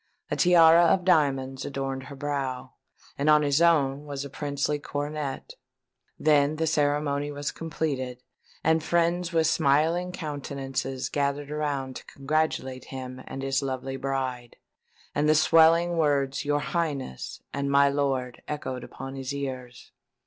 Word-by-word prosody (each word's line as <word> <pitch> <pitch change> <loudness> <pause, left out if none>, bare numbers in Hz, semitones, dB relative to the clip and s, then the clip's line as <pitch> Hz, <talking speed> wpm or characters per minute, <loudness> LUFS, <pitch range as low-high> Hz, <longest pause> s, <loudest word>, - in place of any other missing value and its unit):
A - - +1
tiara 170 -1 +6
of 180 +2 +3
diamonds 135 -6 +2
adorned 135 -1 -4
her 140 - -9
brow 135 -2 -3 0.5
and 145 +2 +2
on 150 0 +6
his 145 +2 +2
own 145 -5 +3
was 140 -1 -5
a 140 - -9
princely 145 0 -2
coronet. 145 -1 -4 0.6
Then 150 -1 +3
the 160 +1 0
ceremony 145 -1 0
was 145 0 -3
completed; 135 -6 -4 0.4
and 160 0 +2
friends 170 +1 +1
with 165 -1 +2
smiling 160 +3 +2
countenances 135 -5 -4
gathered 140 0 -2
around 140 -4 -2
to - - -12
congratulate 135 -2 -2
him 130 -1 -7
and 135 - -6
his 135 0 0
lovely 135 0 -3
bride; 130 -3 -3 0.6
and 150 +1 +1
the 155 - +5
swelling 165 +2 +5
words 140 -3 +1
"Your 145 0 +1
Highness" 145 - -3
and 140 0 -2
"My 140 0 +5
Lord" 135 -3 -1
echoed 130 -4 -4
upon 135 +1 -8
his 135 +1 -4
ears. 130 -3 -6
145 Hz, 140 wpm, -27 LUFS, 135-155 Hz, 0.6 s, tiara